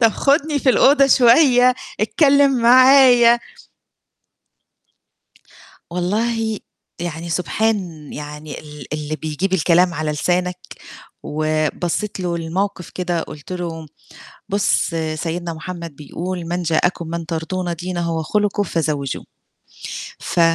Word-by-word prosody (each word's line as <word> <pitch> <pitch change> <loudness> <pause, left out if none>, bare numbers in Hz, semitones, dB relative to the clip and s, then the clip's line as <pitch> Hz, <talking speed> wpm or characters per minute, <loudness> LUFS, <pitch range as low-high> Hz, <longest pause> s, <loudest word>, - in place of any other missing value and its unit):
طب 230 - +6
خُدني 290 +3 +1
في 265 - 0
الأوضة 275 +2 +5
شوية، 250 -1 +5 0.3
اتكلم 275 +1 +3
معايا. 250 -1 +7 2.5
والله 220 +5 -1 0.4
يعني 170 0 -5
سبحان 210 +5 0 0.3
يعني 150 0 -7
ال 150 -2 -11
اللي 150 0 -3
بيجيب 160 +5 -3
الكلام 175 0 +3
على 155 -1 -2
لسانك 180 +4 -1 0.7
وبصّيت 155 +6 -2
له 175 -2 -2
للموقِف 180 +3 -3
كده 175 -2 -2
قُلت 150 +2 -10
له: 165 -3 -5 0.6
"بُص 200 0 +1 0.3
سيدنا 170 +2 -4
محمد 170 -1 -7
بيقول: 175 +4 -5
"من 175 +1 -2
جاءكم 170 +1 0
من 170 0 -4
ترضون 170 +2 -3
دينه 175 -1 -3
وخلقه 205 +6 0
فزَوِّجوه"" 150 -6 -2 0.9
ف - - -2
175 Hz, 100 wpm, -19 LUFS, 160-220 Hz, 2.5 s, معايا